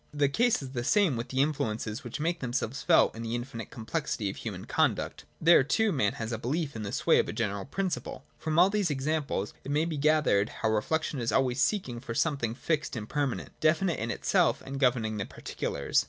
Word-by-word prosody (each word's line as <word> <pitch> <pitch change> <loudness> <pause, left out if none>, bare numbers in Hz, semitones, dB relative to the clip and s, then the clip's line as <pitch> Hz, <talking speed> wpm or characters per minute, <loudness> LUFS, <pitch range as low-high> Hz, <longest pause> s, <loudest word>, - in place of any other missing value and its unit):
— - - -35
The - - +2
case 235 - +2
is 130 - -7
the 120 -2 -3
same 190 - +3
with 115 +1 -4
the 130 +1 +2
influences 115 -4 -2
which - - -6
make 170 +3 0
themselves 125 0 -2
felt 165 -8 +4
in 115 - -6
the 115 0 -2
infinite 120 -2 -5
complexity 110 -2 -3
of - - -11
human - - -6
conduct. - - 0
There, 165 -3 +6
too, 220 - +2
man 110 - +1
has 110 0 -5
the 115 - -3
belief 140 +4 -2
in 110 - -4
the 100 -1 -4
sway - - +3
of - - 0
a - - -3
general 100 -3 -2
principle.— 190 +4 -3
From 155 0 -2
all 180 +3 +6
these 205 -4 +1
examples 140 -7 -1
it - - -7
may 150 +3 +2
be 165 -2 -3
gathered 150 -9 +3
how 110 - +3
reflection 150 +7 0
is 115 -1 -1
always 130 +1 +2
seeking 130 - 0
for 115 -1 -6
something 135 -8 0
fixed 155 +1 -1
and 110 -2 -5
permanent, 145 -2 -2
definite 165 +3 +2
in 115 - -3
itself - - +1
and 135 0 -5
governing 120 -5 +2
the 100 - -2
particulars. 70 - -1
135 Hz, 215 wpm, -29 LUFS, 115-155 Hz, -, There